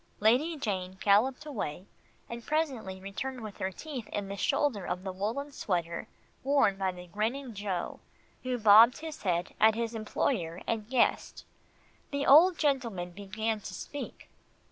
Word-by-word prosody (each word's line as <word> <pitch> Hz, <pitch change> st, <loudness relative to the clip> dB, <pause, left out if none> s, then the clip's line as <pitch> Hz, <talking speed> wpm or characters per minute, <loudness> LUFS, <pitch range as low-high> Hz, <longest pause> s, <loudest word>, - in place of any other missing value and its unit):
Lady 260 Hz, +10 st, +3 dB
Jane 190 Hz, -7 st, -3 dB
galloped 240 Hz, +9 st, +3 dB
away, 195 Hz, -, -4 dB, 0.4 s
and 235 Hz, 0 st, -7 dB
presently 260 Hz, -12 st, -2 dB
returned 240 Hz, +7 st, -5 dB
with 215 Hz, -2 st, -8 dB
her 190 Hz, -, -1 dB
teeth 265 Hz, 0 st, -7 dB
in 200 Hz, -1 st, -4 dB
the 200 Hz, -, -4 dB
shoulder 210 Hz, +2 st, +1 dB
of 180 Hz, +1 st, -3 dB
the 190 Hz, -, -3 dB
woolen 225 Hz, +10 st, -3 dB
sweater 170 Hz, -, -2 dB, 0.4 s
worn 270 Hz, -7 st, +3 dB
by 190 Hz, -1 st, -1 dB
the 180 Hz, 0 st, -10 dB
grinning 225 Hz, +8 st, -3 dB
Joe, 195 Hz, -4 st, -3 dB, 0.4 s
who 255 Hz, -1 st, -2 dB
bobbed 225 Hz, +3 st, +7 dB
his 315 Hz, -1 st, -7 dB
head 175 Hz, -2 st, -1 dB
at 220 Hz, 0 st, +6 dB
his 230 Hz, 0 st, -2 dB
employer 210 Hz, -5 st, -1 dB
and 220 Hz, -1 st, -2 dB
guest. 255 Hz, -1 st, +1 dB, 0.6 s
The 280 Hz, 0 st, -2 dB
old 335 Hz, +5 st, +7 dB
gentleman 235 Hz, -, 0 dB
began 215 Hz, +4 st, -3 dB
to 195 Hz, -2 st, -8 dB
speak. 290 Hz, +9 st, -7 dB
220 Hz, 150 wpm, -30 LUFS, 190-265 Hz, 0.6 s, bobbed